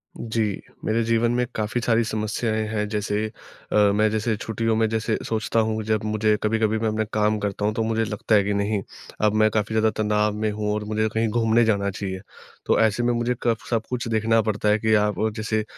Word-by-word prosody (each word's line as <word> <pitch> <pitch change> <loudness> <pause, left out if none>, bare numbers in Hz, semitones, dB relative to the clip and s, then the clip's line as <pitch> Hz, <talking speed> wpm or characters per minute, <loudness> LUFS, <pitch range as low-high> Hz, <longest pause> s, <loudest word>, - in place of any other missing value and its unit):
जी, 110 -3 -2 0.2
मेरे 115 +1 +1
जीवन 115 +1 +2
में 125 +1 +1
काफ़ी 110 +3 -1
सारी 115 0 +2
समस्याएँ 110 0 -1
हैं, 105 -1 -2
जैसे 105 0 -1 0.5
अ, - - 0 0.2
मैं 110 +1 +3
जैसे 110 +1 0
छुट्टियों 110 +1 -1
में 110 0 +2
जैसे 110 0 -1
सोचता 110 +1 0
हूँ 110 0 0
जब 110 0 0
मुझे 110 0 +2
कभी-कभी 110 0 +1
मैं 110 - 0
अपना 110 0 0
काम 105 0 +2
करता 105 0 -2
हूँ 105 - +1
तो 115 - -1
मुझे 115 0 0
लगता 105 +1 0
है 100 - +5
कि 100 +1 -1
नहीं 100 0 0 0.4
अब 105 - +3
मैं 110 - +5
काफ़ी 110 0 -1
ज़्यादा 110 0 +3
तनाव 105 0 +1
में 110 0 -1
हूँ 105 0 -2
और 105 0 -2
मुझे 110 +1 0
कहीं 115 +1 +1
घूमने 115 +1 +3
जाना 100 -2 +1
चाहिए। 95 -1 -4 0.5
तो - - +2
ऐसे 110 +1 +2
में 120 0 +2
मुझे 120 +1 0
कफ 115 -2 0
सब 115 -2 +1
कुछ 125 -2 -3
देखना 115 0 +2
पड़ता 105 -1 0
है 105 +1 +3
कि 110 0 +1
आ 105 0 +4
ब 110 0 0
जैसे 110 0 -1
110 Hz, 220 wpm, -23 LUFS, 105-115 Hz, 0.5 s, है